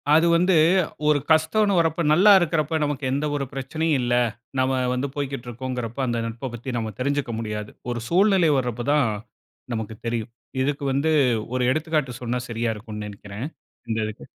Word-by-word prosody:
அது 165 +2 +5
வந்து 180 +2 +3 0.5
ஒரு 150 -1 +4
கஷ்டம்னு 160 +7 +3
வரப்போ 165 0 +1
நல்லாருக்கிறப்போ 170 -4 +5
நமக்கு 145 -1 -2
எந்த 140 +3 0
ஒரு 140 -1 -1
பிரச்சனையும் 155 +3 0
இல்லை. 120 0 +2 0.4
நம்ம 130 +1 +2 0.2
வந்து 125 +3 -1
போய்க்கிட்டு 135 -3 -4
இருக்கோம்கிறப்போ, 125 0 -4
அந்த 120 -1 0
நட்ப 115 +4 -5
பத்தி, 120 +2 -6
நம்ம 110 -2 -3
தெரிஞ்சுக்க 140 -1 -1
முடியாது. 105 -1 -4 0.2
ஒரு 120 - -2
சூழ்நிலை 190 -2 +4
வர்றப்பதான் 125 +3 +1 0.7
நமக்கு 110 -1 -4
தெரியும். 115 -1 -2 0.3
இதுக்கு 145 +1 -1
வந்து 140 +4 +1 0.4
ஒரு 130 - +1
எடுத்துக்காட்டு 150 -4 -1
சொன்னா 125 0 -1
சரியா 115 0 -1
இருக்கும்னு 105 0 -7
நினைக்கிறேன். 100 +4 -7 0.4
இந்த 110 - 0
இதுக்கு. 110 0 -7
130 Hz, 150 wpm, -24 LUFS, 120-155 Hz, 0.7 s, அது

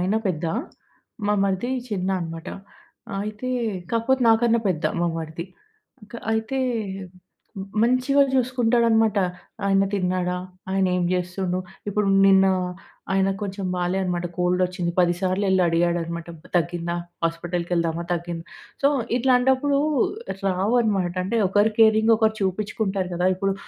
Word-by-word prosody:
ఆయన 190 +4 +1
పెద్ద, 170 -2 -2 0.8
మా 210 - +3
మరిది 195 +6 -1 0.2
చిన్న 190 -4 -2
అన్నమాట. 165 +1 -6 0.7
అయితే 215 +4 -5 0.4
కాకపోతే 235 +3 +1
నాకన్నా 230 +1 +4
పెద్ద 165 -3 -1 0.2
మా 175 - +2
మరిది. 160 +1 -5 0.7
క - - -16 0.2
అయితే 220 +4 -1 1.2
మంచిగా 255 +4 +3
చూసుకుంటాడన్నమాట. 235 -4 +2 0.5
ఆయన 195 0 +3
తిన్నాడా? 180 -1 0 0.4
ఆయనేం 185 -2 +1
చేస్తున్నాడు? 180 0 -1 0.3
ఇప్పుడు 205 0 0 0.2
నిన్న 195 0 +6 0.7
ఆయన 195 0 +2
కొంచెం 195 -1 -4
బాలేదన్నమాట, 180 -1 -1
కోల్డ్ 180 +1 +1
వచ్చింది. 180 -1 -2
పది 175 -1 +3
సార్లు 190 +1 0
వెళ్లి 190 -1 +3
అడిగాడన్నమాట, 170 0 0 0.3
"తగ్గిందా? 170 0 -1 0.3
హాస్పిటల్‌కెళ్దామా? 170 0 -1
తగ్గిందా?" 170 -1 -4 0.4
సో, 280 - +6 0.3
ఇట్లాంటప్పుడు 265 +3 +3 0.7
రావన్నమాట. 195 -1 +1
అంటే 230 +5 0
ఒకరు 205 +3 +3
కేరింగ్ 220 0 +5
ఒకరు 220 0 +2
చూపించుకుంటారు 195 -1 -1
కదా! 180 +1 +2
ఇప్పుడు 195 +1 0
190 Hz, 110 wpm, -23 LUFS, 175-220 Hz, 1.2 s, నిన్న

